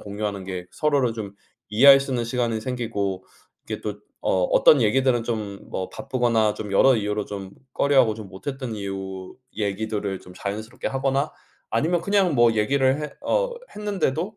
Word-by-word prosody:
공유하는 100 -1 -4
게 90 -1 -5
서로를 140 -6 +1
좀 105 -3 -6 0.3
이해할 135 +6 +8
수 135 0 -5
있는 120 -2 0
시간이 115 -2 -1
생기고 110 -6 -3 0.4
이렇게 - - -4
또 - - -5 0.2
어 95 - +2
어떤 145 - +6
얘기들은 120 +1 +2
좀 105 -4 -3
뭐 95 - -4
바쁘거나 115 -4 +1
좀 105 -2 -6
여러 130 +7 +5
이유로 105 -2 -1
좀 100 -2 -7 0.2
꺼려하고 130 -6 +3
좀 105 -2 -9
못했던 130 +6 -6
이유 95 -2 -6 0.2
얘기들을 105 -1 -2
좀 90 - -14
자연스럽게 110 +3 -5
하거나 135 +1 0 0.4
아니면 160 +10 +1
그냥 195 -4 +2
뭐 120 -1 +5
얘기를 130 +6 +2
했 150 -2 -6
어 - - +2 0.2
했는데도 200 -2 -2
115 Hz, 345 characters per minute, -24 LUFS, 100-135 Hz, 0.4 s, 이해할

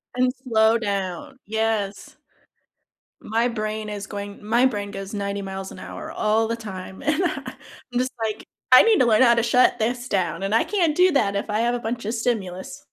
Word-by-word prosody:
And 250 0 +2
slow 225 -2 +3
down. 200 +1 -4
Yes. 220 -2 -2 1.0
My 230 +2 0
brain 215 -2 -3
is 205 -1 -5
going 200 0 -7
My 235 +4 +3
brain 205 -5 -1
goes 195 0 -7
90 200 -1 -3
miles 190 0 -6
an - - -10
hour - - -8
all 220 +1 +1
the 230 - -1
time, 190 -4 -8
and 305 +5 +1
I 355 - +1
and - - -8 0.4
I'm 245 - +1
just 255 +1 -1
like, 215 -1 -3 0.3
I 255 - +10
need 450 -3 +4
to - - +5
learn 220 -1 +4
how 235 -2 +6
to 235 - +2
shut 250 +2 +3
this 240 +2 -1
down, 190 -1 -1
and 195 +2 -1
I 230 - +4
can't 345 -7 +1
do 365 +2 +5
that 205 -8 +2
if 200 - -3
I 210 +1 0
have 240 +1 +1
a - - -2
bunch 235 0 -4
of 220 - -2
stimulus. 205 -6 -3
220 Hz, 210 wpm, -23 LUFS, 200-245 Hz, 1.0 s, I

